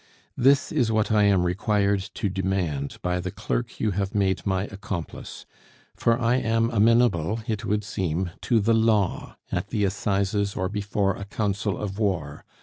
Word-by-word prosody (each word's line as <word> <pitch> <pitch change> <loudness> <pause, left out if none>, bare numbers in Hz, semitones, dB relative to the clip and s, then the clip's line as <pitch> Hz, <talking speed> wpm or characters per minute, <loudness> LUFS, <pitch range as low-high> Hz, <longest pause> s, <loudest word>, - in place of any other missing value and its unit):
"This 135 +2 +3
is 125 -8 +1
what 110 -1 +1
I 105 -1 +4
am 100 -3 +4
required 100 +2 +1 0.2
to 105 - -1
demand 95 -7 -2
by 90 0 0
the 90 +1 -3
clerk - - -3
you 110 - +1
have 100 +1 -2
made 95 -1 +1
my 95 -1 +1
accomplice; 100 -5 -6 0.5
for 115 +1 +2
I 120 +1 +2
am 115 -1 +1
amenable, 115 -3 +3
it 110 -4 -3
would 105 +1 0
seem, 90 -3 -2
to 115 - +2
the 110 +2 +2
law, 110 -4 +1
at - - -2
the 105 - -1
Assizes, 100 +1 0
or 95 0 -1
before 100 -1 0
a 100 - -7
council 100 -1 -1
of 100 0 -5
war. 85 -9 -1
100 Hz, 165 wpm, -25 LUFS, 95-110 Hz, 0.5 s, I